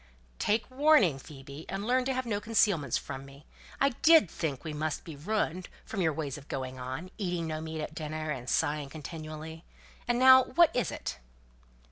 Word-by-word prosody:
"Take 220 Hz, +4 st, 0 dB
warning, 260 Hz, -, +4 dB
Phoebe, 140 Hz, +2 st, -11 dB
and 195 Hz, +1 st, -3 dB
learn 255 Hz, +2 st, +2 dB
to 265 Hz, -, 0 dB
have 255 Hz, 0 st, -1 dB
no 205 Hz, -3 st, -2 dB
concealments 200 Hz, -, +2 dB
from 130 Hz, 0 st, -6 dB
me. 140 Hz, +1 st, -14 dB, 0.3 s
I 275 Hz, -, +4 dB
did 310 Hz, -, +5 dB
think 145 Hz, -6 st, -3 dB
we 155 Hz, -2 st, -5 dB
must 155 Hz, 0 st, -2 dB
be 160 Hz, -, -8 dB
ruined, 185 Hz, +2 st, -2 dB, 0.2 s
from 200 Hz, -, -3 dB
your 160 Hz, -2 st, +3 dB
ways 150 Hz, -2 st, -4 dB
of 145 Hz, -, -17 dB
going 130 Hz, -1 st, -5 dB
on: 130 Hz, +9 st, -6 dB
eating 175 Hz, -4 st, -1 dB
no 155 Hz, -1 st, -3 dB
meat 160 Hz, 0 st, -5 dB
at 150 Hz, -, -6 dB
dinner, 155 Hz, 0 st, -4 dB
and 125 Hz, -3 st, -5 dB
sighing 145 Hz, -1 st, 0 dB
continually. 155 Hz, +1 st, -8 dB, 0.4 s
And 240 Hz, 0 st, +2 dB
now 260 Hz, 0 st, +8 dB
what 340 Hz, -2 st, +4 dB
is 245 Hz, -, +1 dB
it?" 75 Hz, -, -5 dB
160 Hz, 185 wpm, -30 LUFS, 145-215 Hz, 0.4 s, now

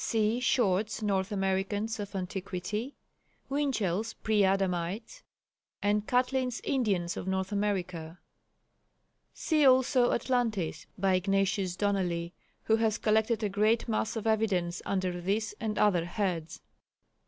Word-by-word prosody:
(See 225 Hz, +1 st, +1 dB
Short's 215 Hz, -3 st, +1 dB
North 195 Hz, -2 st, 0 dB
Americans 200 Hz, +3 st, -1 dB
of 200 Hz, -1 st, -6 dB
Antiquity, 195 Hz, +6 st, -4 dB, 0.5 s
Winchell's 230 Hz, -8 st, 0 dB
Pre 215 Hz, -2 st, +1 dB
Adamites, 195 Hz, -, -1 dB, 0.6 s
and 205 Hz, +1 st, +1 dB
Catlin's 250 Hz, 0 st, +1 dB
Indians 200 Hz, -10 st, 0 dB
of -, -, -5 dB
North 190 Hz, +1 st, -1 dB
America; 180 Hz, -5 st, -2 dB, 1.1 s
see 310 Hz, -2 st, +1 dB
also 255 Hz, -1 st, +5 dB
Atlantis, 230 Hz, -10 st, -1 dB
by 190 Hz, 0 st, +2 dB
Ignatius 195 Hz, 0 st, +1 dB
Donnelly 180 Hz, -4 st, -1 dB, 0.3 s
who 220 Hz, -, +3 dB
has 220 Hz, -2 st, +1 dB
collected 220 Hz, +1 st, +1 dB
a 210 Hz, -, +1 dB
great 215 Hz, +4 st, +2 dB
mass 220 Hz, 0 st, -1 dB
of 225 Hz, -, -4 dB
evidence 195 Hz, -6 st, +1 dB
under 185 Hz, -2 st, -1 dB
this 210 Hz, +4 st, -1 dB
and 215 Hz, -1 st, -2 dB
other 180 Hz, -5 st, +3 dB
heads.) 175 Hz, -3 st, -3 dB
205 Hz, 120 wpm, -30 LUFS, 185-225 Hz, 1.1 s, also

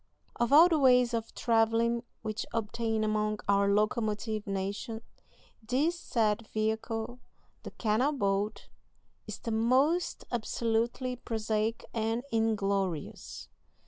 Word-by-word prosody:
Of 240 Hz, +1 st, 0 dB
all 315 Hz, +5 st, +9 dB
the 325 Hz, -3 st, +2 dB
ways 250 Hz, -3 st, +5 dB
of 230 Hz, -1 st, -3 dB
travelling 230 Hz, 0 st, +2 dB, 0.2 s
which 220 Hz, 0 st, -3 dB
obtain 225 Hz, 0 st, -1 dB
among 215 Hz, 0 st, 0 dB
our 200 Hz, 0 st, +3 dB
locomotive 215 Hz, +1 st, 0 dB
nation, 200 Hz, +4 st, -3 dB, 0.6 s
this 280 Hz, +10 st, 0 dB
said 220 Hz, -6 st, 0 dB
vehicle, 220 Hz, +2 st, -2 dB, 0.4 s
the -, -, -7 dB
canal 230 Hz, +6 st, +1 dB
boat, 205 Hz, -5 st, -1 dB, 0.6 s
is -, -, -5 dB
the 230 Hz, -, -5 dB
most 260 Hz, +10 st, +2 dB
absolutely 235 Hz, +2 st, -1 dB
prosaic 220 Hz, -1 st, -2 dB
and 225 Hz, +1 st, -1 dB
inglorious. 200 Hz, -7 st, -1 dB
225 Hz, 110 wpm, -30 LUFS, 215-240 Hz, 0.6 s, all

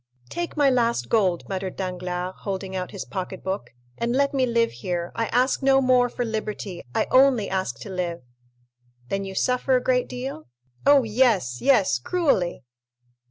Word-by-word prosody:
"Take 345 Hz, -2 st, -4 dB
my 290 Hz, -2 st, +4 dB
last 235 Hz, -2 st, +1 dB
gold," 190 Hz, -6 st, +2 dB
muttered 190 Hz, -1 st, -4 dB
Danglars, 180 Hz, -1 st, -3 dB
holding 190 Hz, -1 st, -4 dB
out 180 Hz, -1 st, -3 dB
his 195 Hz, -, -6 dB
pocket 190 Hz, -1 st, -5 dB
book, 190 Hz, +2 st, -3 dB, 0.3 s
"and 235 Hz, +1 st, 0 dB
let 280 Hz, +1 st, +2 dB
me 260 Hz, -2 st, +2 dB
live 235 Hz, -1 st, +2 dB
here; 175 Hz, +7 st, -4 dB
I 230 Hz, -1 st, -1 dB
ask 250 Hz, +4 st, +1 dB
no 270 Hz, 0 st, +5 dB
more 255 Hz, -2 st, +4 dB
for 245 Hz, -, -3 dB
liberty—I 210 Hz, -, -3 dB
only 255 Hz, -5 st, +5 dB
ask 190 Hz, -10 st, -2 dB
to -, -, -7 dB
live!" 175 Hz, -5 st, -3 dB, 0.9 s
"Then 195 Hz, 0 st, -2 dB
you 190 Hz, 0 st, -7 dB
suffer 250 Hz, +4 st, +2 dB
a 250 Hz, -, +1 dB
great 250 Hz, -1 st, +1 dB
deal?" 250 Hz, -, -6 dB, 0.4 s
"Oh, 285 Hz, -2 st, +7 dB
yes, 215 Hz, -, +2 dB
yes, 240 Hz, -, +3 dB
cruelly!" 190 Hz, -, 0 dB
215 Hz, 160 wpm, -24 LUFS, 185-255 Hz, 0.9 s, Oh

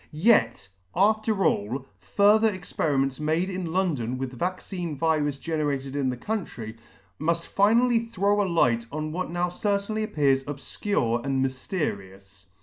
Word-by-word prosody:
Yet, 120 Hz, -, +4 dB, 0.3 s
after 215 Hz, +1 st, +2 dB
all, 125 Hz, +7 st, 0 dB
further 215 Hz, +2 st, +4 dB
experiments 140 Hz, -7 st, -1 dB
made 160 Hz, +5 st, 0 dB
in 180 Hz, -3 st, -4 dB
London 145 Hz, -10 st, 0 dB
with 130 Hz, 0 st, -4 dB
vaccine 175 Hz, +1 st, -4 dB
virus 150 Hz, -2 st, +1 dB
generated 145 Hz, -3 st, -2 dB
in 140 Hz, -2 st, +1 dB
the 125 Hz, -, -3 dB
country, 125 Hz, -, -4 dB, 0.4 s
muft 170 Hz, +1 st, 0 dB
finally 230 Hz, +6 st, +3 dB
throw 205 Hz, -2 st, +1 dB
a 195 Hz, -, 0 dB
light 120 Hz, -9 st, +2 dB
on 155 Hz, +1 st, -3 dB
what 185 Hz, +3 st, -3 dB
now 175 Hz, +1 st, -1 dB
certainly 200 Hz, +3 st, -1 dB
appears 140 Hz, -9 st, +2 dB
obfcure 135 Hz, -, -2 dB
and 135 Hz, 0 st, +1 dB
myfterious. 100 Hz, -, -5 dB
160 Hz, 135 wpm, -26 LUFS, 135-195 Hz, 0.4 s, Yet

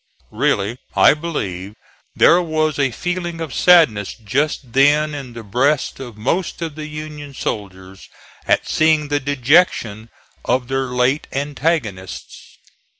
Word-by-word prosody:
Really, 105 Hz, +5 st, 0 dB, 0.2 s
I -, -, +6 dB
believe 105 Hz, -, -5 dB, 0.4 s
there 175 Hz, +2 st, +5 dB
was 155 Hz, -3 st, -1 dB
a 140 Hz, -1 st, +2 dB
feeling 175 Hz, +4 st, -4 dB
of 160 Hz, -4 st, -5 dB
sadness 155 Hz, -, +4 dB
just 130 Hz, +3 st, -2 dB
then 150 Hz, +3 st, +3 dB
in 135 Hz, -4 st, -7 dB
the 115 Hz, -1 st, -8 dB
breasts 130 Hz, +9 st, 0 dB
of 120 Hz, -5 st, -9 dB
most 165 Hz, -, -2 dB
of 160 Hz, -2 st, -4 dB
the 155 Hz, 0 st, -7 dB
Union 150 Hz, -2 st, -8 dB
soldiers 95 Hz, -4 st, -6 dB, 0.4 s
at -, -, +2 dB
seeing 155 Hz, -2 st, +2 dB
the 145 Hz, 0 st, +1 dB
dejection 130 Hz, -, +1 dB, 0.3 s
of 125 Hz, 0 st, -1 dB
their 135 Hz, 0 st, 0 dB
late 125 Hz, +3 st, 0 dB
antagonists. 135 Hz, -, -3 dB
140 Hz, 130 wpm, -19 LUFS, 115-155 Hz, 0.4 s, I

